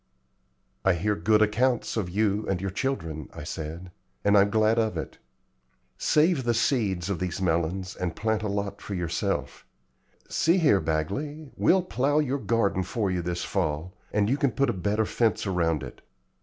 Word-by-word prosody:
"I 95 - +4
hear 105 +5 0
good 105 +5 +3
accounts 120 +3 +1
of 105 -6 -1
you 105 +2 0
and 95 -2 0
your 95 0 -3
children," 80 - -3
I - - -8
said, 80 +4 -6 0.3
"and 100 0 +4
I'm 100 0 +5
glad 110 +1 +3
of 110 -6 0
it. 80 - -6 0.8
Save 155 -2 +2
the 120 -1 +1
seeds 110 -7 +1
of 90 - -2
these 90 0 -3
melons 90 +1 -1
and 90 -2 -3
plant 110 -1 0
a 105 - -2
lot 100 0 -3
for 100 - -5
yourself. 85 -2 -2 0.6
See 170 +3 +2
here, 145 - +4
Bagley, 135 - -3
we'll 185 0 +3
plow 145 -4 0
your 140 -2 +1
garden 100 -7 +1
for 95 +2 -1
you 90 -1 -1
this 85 0 -3
fall, 80 -1 -2 0.2
and 105 -1 +2
you 135 +5 +1
can 140 -5 +1
put 135 +2 +2
a - - -4
better 100 +4 0
fence 115 0 +1
around 85 -6 0
it. 65 - -9
100 Hz, 175 wpm, -27 LUFS, 90-115 Hz, 0.8 s, I'm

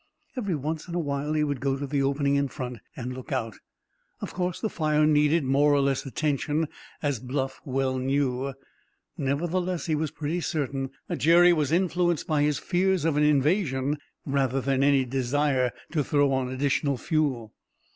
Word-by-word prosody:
Every 205 -9 -1
once 155 +3 -4
in 170 - -5
a - - +1
while 145 -1 -2
he 155 -1 +2
would 145 -3 -1
go 135 0 0
to 140 - -3
the 140 0 0
opening 140 +1 +1
in 140 0 +2
front 125 -4 -6 0.2
and 125 0 -5
look 130 +4 -9
out. 115 -5 -2 0.6
Of - - -6
course, 180 -1 -2
the 220 - -1
fire 155 -5 +1
needed 150 +1 +3
more 140 +3 +3
or - - +3
less 135 0 0
attention, 150 +2 -1 0.3
as 140 -5 0
Bluff 135 +2 -3
well 130 -1 0
knew; 135 0 0 0.6
nevertheless, 175 +6 -1
he 160 - 0
felt 155 0 -2
pretty 160 +4 -2
certain 140 -5 -2 0.2
that - - -3
Jerry 175 +2 +6
was 150 -4 0
influenced 175 -1 +1
by 155 -2 +1
his 150 0 +2
fears 185 -1 +1
of 160 -3 +2
an 150 - +2
invasion 150 -1 +2 0.3
rather 135 -2 +1
than 135 0 0
any 140 -2 +4
desire 130 0 +1 0.2
to 155 -3 +1
throw 145 0 +2
on 130 -1 0
the 130 - -5
additional 140 +1 0
fuel. 130 -8 -1
145 Hz, 180 wpm, -26 LUFS, 135-155 Hz, 0.6 s, Jerry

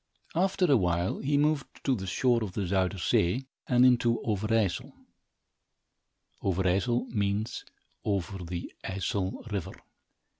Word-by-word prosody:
After 185 +2 +2
a 140 -6 +5
while, 90 -2 0
he 140 +1 +1
moved 150 -1 +2 0.2
to 135 - +2
the 95 -4 -5
shore 120 +4 +2
of 100 -4 -5
the 100 - -1
Zuyder 95 +1 +1
Zee 90 +8 +1 0.2
and 125 0 +5
into 120 -2 +4
Overijssel. 110 -1 0 1.5
Overijssel 95 +7 +1
means 105 0 -1 0.4
over 95 -2 -2
the 85 0 -5
Ijssel 95 +1 -2
River. 95 -2 -3
100 Hz, 120 wpm, -29 LUFS, 95-125 Hz, 1.5 s, a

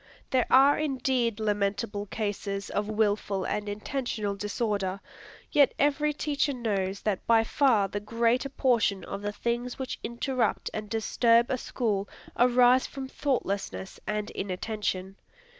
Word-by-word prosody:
There 255 -2 +2
are 275 +3 +6
indeed 260 -6 0
lamentable 205 0 -1
cases 200 -1 -3
of 210 +1 -1
wilful 205 -3 0
and 210 0 -2
intentional 215 -1 -3
disorder. 200 -2 -2 0.5
Yet 285 -2 +4
every 295 +1 +2
teacher 290 -1 0
knows 200 -5 -2
that 205 -4 -2
by 225 -1 +5
far 225 -5 +3
the 205 - -4
greater 230 +5 +1
portion 235 -8 +1
of 195 - -6
the 205 0 -2
things 240 +3 -2
which 265 -1 -4
interrupt 240 +2 -1
and 215 -1 -5
disturb 230 +1 +3
a 260 - +1
school 205 -6 -2 0.3
arise 250 +1 +5
from 270 -1 -6
thoughtlessness 205 -9 -2
and 210 0 -2
inattention. 195 0 -3
225 Hz, 130 wpm, -28 LUFS, 205-255 Hz, 0.5 s, are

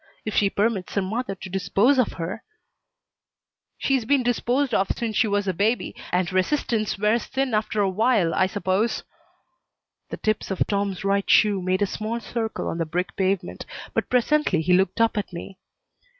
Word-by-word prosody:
If 215 - -3
she 200 - +3
permits 200 -2 -1
her 200 - +2
mother 210 +1 -3
to 190 - -9
dispose 195 +8 +2
of 250 - +2
her 175 +6 -5 0.8
" - - -66 0.3
"She's 270 -3 +1
been 270 +3 +2
disposed 245 +2 0
of 195 -1 +2
since 225 -2 -2
she 225 - +3
was 205 -1 0
a 190 - +1
baby, 210 +7 0 0.2
and 180 0 0
resistance 215 +1 0
wears 210 +3 +1
thin 265 -2 -1
after 215 0 0
a 200 - +3
while, 205 -4 +2
I 190 - +3
suppose." 200 +2 0 1.1
The - - -5
tips 215 -1 -1
of 190 - 0
Tom's 200 -2 -2
right 200 0 +1
shoe 205 -3 +4
made 185 +2 +1
a - - +4
small 215 +4 -3
circle 225 0 -3
on 165 - -3
the 165 - 0
brick 180 +4 -2
pavement, 190 -1 -1 0.3
but - - -1
presently 250 - +2
he 180 +3 +2
looked 190 +4 +2
up 230 -1 +3
at 200 - -5
me. 180 +2 -8
205 Hz, 180 wpm, -24 LUFS, 190-230 Hz, 1.1 s, shoe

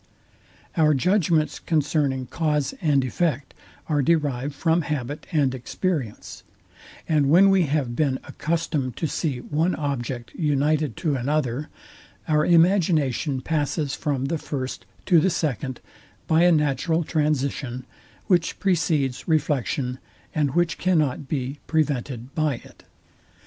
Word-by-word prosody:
Our 155 -2 +4
judgments 165 0 +2
concerning 145 -4 0
cause 150 - -1
and 145 -6 +2
effect 145 0 -1 0.3
are 150 -3 +1
derived 145 -3 0
from 165 +3 +2
habit 150 -2 -4
and 140 -5 +2
experience; 130 - -3 0.7
and 150 -4 +2
when 190 +5 +6
we 185 -4 +3
have 135 -5 -1
been 135 -2 +1
accustomed 150 -6 -2
to - - -1
see 145 -4 -2
one 160 +7 0
object 130 -5 -4
united 150 - 0
to 150 -3 +2
another, 135 +1 -1 0.6
our 150 -2 +3
imagination 165 -6 +3
passes 150 -1 -1
from 140 -4 -2
the 160 +3 -1
first 130 -4 -5 0.2
to 175 -4 +5
the 190 - +3
second, 135 -6 -2 0.4
by 160 +2 +4
a 175 - +6
natural 155 +2 +1
transition, 140 -5 -1 0.4
which 175 -3 +1
precedes 160 -8 0
reflection, 140 -5 0 0.3
and 145 -2 0
which 175 -1 +1
cannot 155 -7 +1
be 135 0 -3
prevented 135 -5 -1
by 155 -4 +1
it. - - -15
150 Hz, 125 wpm, -24 LUFS, 135-160 Hz, 0.7 s, when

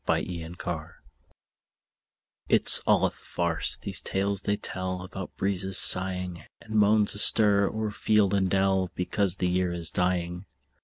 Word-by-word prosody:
MERRY 85 -2 -2
AUTUMN 85 -1 -7 1.6
It's - - +7
all - - +3
a - - -1
farce, 85 -2 -3
these - - -4
tales 100 0 -2
they 105 0 -2
tell 95 -1 -5
About 95 0 -8
the - - -44
breezes 95 -1 -2
sighing, 90 -2 +1 0.2
And 110 - -11
moans 105 0 +2
astir 105 -1 +4
o'er 110 -1 -4
field 105 -1 +1
and 95 -2 +1
dell, 95 -1 0
Because 90 +1 -1
the 90 - -2
year 90 0 -1
is 85 -3 -4
dying. 90 +1 -2
95 Hz, 145 wpm, -26 LUFS, 90-100 Hz, 1.6 s, It's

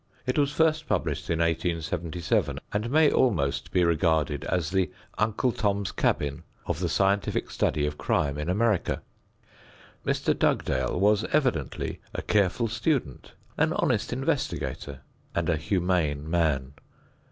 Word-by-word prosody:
It 125 - 0
was 140 -1 +2
first 155 0 +2
published - - -1
in 85 - +1
1877 85 - -1 0.2
and 105 +3 -1
may 155 +2 +5
almost 70 - +1
be 90 - +3
regarded 80 -3 +1
as 90 -3 -1
the 95 -1 +1 0.3
"Uncle 110 +4 +1
Tom's 100 -3 -1
Cabin" 70 +1 0 0.2
of - - -2
the 90 -2 -1
scientific 100 +2 +1
study 75 - +1
of 75 0 -4
crime 70 +1 0
in 75 +3 -3
America. 105 0 +1 1.0
Mr. - - +1
Dugdale 65 +5 +1
was 105 +2 +4
evidently 130 - -1
a - - -3
careful 105 +3 +2
student, 120 - -2 0.3
an - - +3
honest - - 0
investigator 130 - -2 0.3
and - - 0
a 85 - +3
humane 85 -4 0
man. 75 -6 0
90 Hz, 130 wpm, -27 LUFS, 75-110 Hz, 1.0 s, may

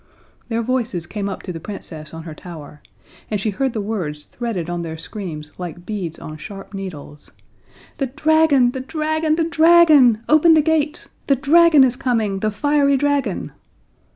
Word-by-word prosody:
Their 230 0 -1
voices 230 -8 -1
came 200 +2 -4
up 195 - -6
to 180 - -5
the 165 - -6
Princess 160 -5 -8
on 165 0 -8
her 160 -1 -8
tower, 150 -3 -11 0.5
and 210 - -1
she 210 +2 -1
heard 265 +5 -1
the 215 - -2
words 175 -9 -4
threaded 225 -9 -4
on 175 0 -3
their 160 -1 -6
screams 160 -5 -7
like 175 0 -7
beads 185 -6 -4
on 155 0 -9
sharp 195 +6 -10
needles: 160 -7 -7 0.7
"The 275 - 0
dragon, 305 -2 +3
the 260 - -5
dragon, 310 +2 -1
the 330 - +1
dragon! 315 -8 +5
Open 315 +2 +6
the 310 - +4
gates! 310 -1 0 0.2
The 275 - +4
dragon 300 +2 +5
is 255 -2 +2
coming! 225 -7 -1
The 215 - 0
fiery 280 +5 +2
dragon!" 280 -7 -1
225 Hz, 170 wpm, -20 LUFS, 175-290 Hz, 0.7 s, Open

